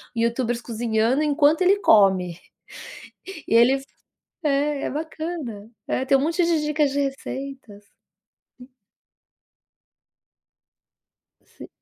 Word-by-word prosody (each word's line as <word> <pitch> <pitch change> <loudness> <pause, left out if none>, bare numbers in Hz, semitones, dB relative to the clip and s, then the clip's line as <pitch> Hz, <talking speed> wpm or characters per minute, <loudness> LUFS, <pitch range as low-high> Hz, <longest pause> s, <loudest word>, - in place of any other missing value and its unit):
YouTubers 235 +1 -1
cozinhando 230 +3 0
enquanto 300 +3 +2
ele 385 +2 +4
come. 190 - +3 1.1
E - - +1
ele 260 +4 +4 0.6
é, 285 0 0
é - - -2
bacana. 305 -8 -6 0.2
É, 260 - -1
tem 275 0 +4
um - - -2
monte 335 +4 0
de 330 -3 +1
dicas 300 -2 0
de 285 - -2
receitas. 270 -5 -6 0.8
Hum. 250 - -13 2.8
Sim. - - -14
270 Hz, 100 wpm, -23 LUFS, 230-300 Hz, 2.8 s, ele